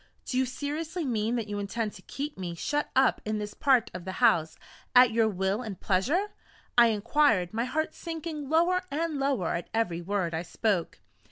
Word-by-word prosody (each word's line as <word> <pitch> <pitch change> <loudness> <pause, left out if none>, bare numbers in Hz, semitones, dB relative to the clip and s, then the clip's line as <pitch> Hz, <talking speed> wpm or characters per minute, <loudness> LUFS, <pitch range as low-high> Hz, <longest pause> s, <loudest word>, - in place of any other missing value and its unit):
"Do - - -4
you 260 0 +2
seriously 305 +6 -4
mean 230 -2 0
that 230 -3 -2
you 205 0 -3
intend 210 +2 -3
to - - -12
keep 290 +2 -5
me 175 -3 -5
shut 295 - -1
up 265 0 +3
in 215 0 -2
this 210 0 -5
part 265 -4 +2
of 180 -1 -6
the 190 +1 -5
house, 200 -10 +3 0.4
at 250 -1 +8
your 225 0 +3
will 195 +2 -1
and 215 -7 -6
pleasure?" 290 - +1 0.4
I 240 -1 +7
inquired, 220 -3 +2
my 230 +2 0
heart 315 +4 -1
sinking 320 -4 -6
lower 345 +4 +3
and 310 0 -2
lower 270 -11 0
at 170 - -4
every 175 -7 0
word 185 -2 -1
I 160 - -1
spoke. 185 0 -1
230 Hz, 190 wpm, -28 LUFS, 200-290 Hz, 0.4 s, at